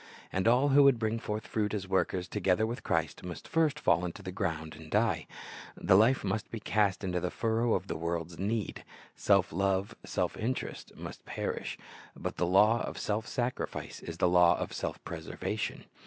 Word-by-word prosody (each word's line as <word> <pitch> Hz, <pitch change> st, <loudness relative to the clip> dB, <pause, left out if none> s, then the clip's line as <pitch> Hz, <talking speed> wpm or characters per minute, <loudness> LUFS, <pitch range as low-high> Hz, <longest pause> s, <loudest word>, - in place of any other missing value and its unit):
And 95 Hz, +3 st, +1 dB
all 125 Hz, +5 st, +5 dB
who 140 Hz, +1 st, +7 dB
would 140 Hz, -3 st, +6 dB
bring 115 Hz, 0 st, -1 dB
forth 105 Hz, -1 st, -4 dB
fruit 105 Hz, -1 st, -1 dB
as 95 Hz, -2 st, -4 dB
workers 95 Hz, -1 st, 0 dB
together 95 Hz, +2 st, +1 dB
with 120 Hz, +4 st, -4 dB
Christ, 80 Hz, -3 st, -1 dB
must 90 Hz, -2 st, -7 dB
first 155 Hz, -2 st, +2 dB
fall 85 Hz, -, +3 dB
into 90 Hz, -1 st, -5 dB
the 95 Hz, -, -5 dB
ground 80 Hz, -3 st, -3 dB
and 80 Hz, -1 st, -12 dB
die. 110 Hz, +4 st, +1 dB, 0.5 s
The -, -, +4 dB
life 115 Hz, +7 st, +5 dB
must 100 Hz, +2 st, -2 dB
be 115 Hz, -, -5 dB
cast 100 Hz, -1 st, +1 dB
into 90 Hz, -2 st, 0 dB
the 90 Hz, +1 st, -1 dB
furrow 115 Hz, +2 st, +1 dB
of 95 Hz, -, -2 dB
the -, -, -4 dB
world's 85 Hz, +1 st, -3 dB
need. 105 Hz, +2 st, -2 dB, 0.3 s
Self 100 Hz, -4 st, +3 dB
love, 100 Hz, +4 st, 0 dB
self -, -, -1 dB
interest, 125 Hz, +4 st, -3 dB
must -, -, -8 dB
perish. -, -, -3 dB, 0.4 s
But -, -, -5 dB
the 90 Hz, -, +1 dB
lav/ 105 Hz, +6 st, +5 dB
of -, -, -4 dB
self 105 Hz, +1 st, -2 dB
sacrifice 125 Hz, -1 st, -3 dB
is 85 Hz, 0 st, -7 dB
the 90 Hz, -, +3 dB
law 90 Hz, -1 st, +5 dB
of -, -, -4 dB
self -, -, -3 dB
preservation. 80 Hz, -1 st, -4 dB
100 Hz, 185 wpm, -31 LUFS, 90-115 Hz, 0.5 s, who